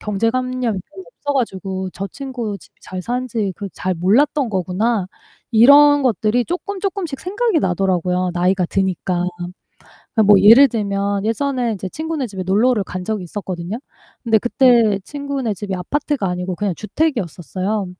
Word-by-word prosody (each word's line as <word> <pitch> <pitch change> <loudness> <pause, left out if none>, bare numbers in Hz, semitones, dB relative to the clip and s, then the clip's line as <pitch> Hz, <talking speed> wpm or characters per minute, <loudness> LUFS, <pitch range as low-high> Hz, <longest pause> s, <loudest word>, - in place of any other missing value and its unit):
경제관념이 230 +1 -1
별로 380 - -11
없어 290 -12 -5
가지고 190 -6 -2
저 195 +2 -4
친구 245 -7 -5
집이 - - -20
잘 185 0 -6
사는지 235 -4 -2
그걸 200 -2 -6
잘 185 0 -2
몰랐던 235 - +2
거구나.' 190 +2 0 0.4
이런 285 +5 +7
것들이 235 0 +1
쪼끔, 375 +3 -4
쪼끔씩 380 -8 -3
생각이 400 -2 0
나더라고요 180 -1 0
나이가 180 +1 +1
드니까. 185 -2 -1 0.9
그 220 - +5
뭐 205 -1 +6
예를 230 +8 +8
들면 200 -2 -1
예전에 245 +1 0
인제 190 -2 -5
친구네 315 -4 -3
집에 195 -3 -6
놀러를 210 +4 +2
간 180 0 -6
적이 215 -2 -2
있었거든요. 185 +2 -5 0.5
근데 225 -1 +4
그떄 235 -4 +3
친구네 280 -6 -3
집이 195 +1 -5
아파트가 275 +2 -2
아니고 180 0 -3
그냥 200 -4 -1
주택이었었어요. 205 - -2
215 Hz, 355 characters per minute, -19 LUFS, 190-260 Hz, 0.9 s, 예를